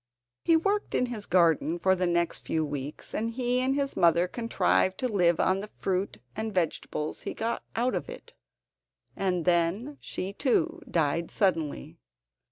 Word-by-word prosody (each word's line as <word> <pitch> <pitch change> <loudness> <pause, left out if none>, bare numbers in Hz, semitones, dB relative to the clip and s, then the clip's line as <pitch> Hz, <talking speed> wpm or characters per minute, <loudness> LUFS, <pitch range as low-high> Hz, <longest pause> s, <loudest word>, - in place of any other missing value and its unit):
He 330 -1 +5
worked 405 +5 0
in 250 - +2
his 230 -4 -5
garden 170 -2 +3
for 190 +2 +3
the 180 -1 0
next 170 -1 +1
few 160 -1 -1
weeks, 145 0 -5
and 225 +2 -1
he 250 +1 0
and 265 +1 +1
his 280 -1 -1
mother 170 +1 +4
contrived 185 - +1
to 255 - 0
live 175 -7 +2
on 190 +1 +2
the 205 +1 -6
fruit 190 - -1 0.2
and 220 0 -3
vegetables 165 -4 -2
he - - -5
got 230 +1 -2
out 245 +3 +1
of - - -3
it, 485 0 -10 0.8
and 180 -3 0
then 180 - +1
she 190 +2 -5
too 240 - +1
died 165 +1 0
suddenly. 165 - -1
190 Hz, 165 wpm, -28 LUFS, 170-240 Hz, 0.8 s, He